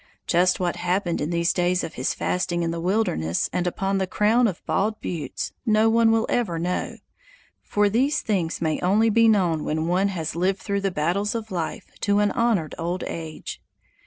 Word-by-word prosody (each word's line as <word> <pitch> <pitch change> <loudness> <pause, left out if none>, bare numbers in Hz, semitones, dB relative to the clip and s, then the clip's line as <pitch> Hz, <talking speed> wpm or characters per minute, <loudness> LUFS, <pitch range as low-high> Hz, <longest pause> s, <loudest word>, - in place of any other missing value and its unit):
Just 180 +1 +2
what 180 -2 -1
happened 175 0 -1
in 150 - -1
these 170 0 +1
days 180 0 +1
of - - -5
his 130 - -2
fasting 175 -1 -1
in 165 - -1
the 165 - -4
wilderness 175 - 0
and 180 0 0
upon 195 +2 -1
the 190 - -1
crown 225 +5 +3
of 185 -5 -5
bald 215 +2 0
buttes, 150 -7 -4
no 220 -1 +3
one 230 0 +4
will 225 0 +2
ever 205 -9 0
know; 175 +2 -2 0.6
for 205 0 +1
these 260 +8 +1
things 180 -6 -1
may 160 -2 0
only 215 +5 +3
be 230 +1 +5
known 180 -8 +2
when 155 +1 -1
one 180 +4 +2
has 165 -6 -3
lived 185 +3 +1
through 200 -2 -2
the 195 - +1
battles 185 +6 -1
of 220 -2 -5
life 170 -3 -4
to 205 0 +1
an 205 -1 +3
honored 230 -10 +1
old 175 +2 -2
age. 160 -2 -6
185 Hz, 190 wpm, -24 LUFS, 170-210 Hz, 0.6 s, be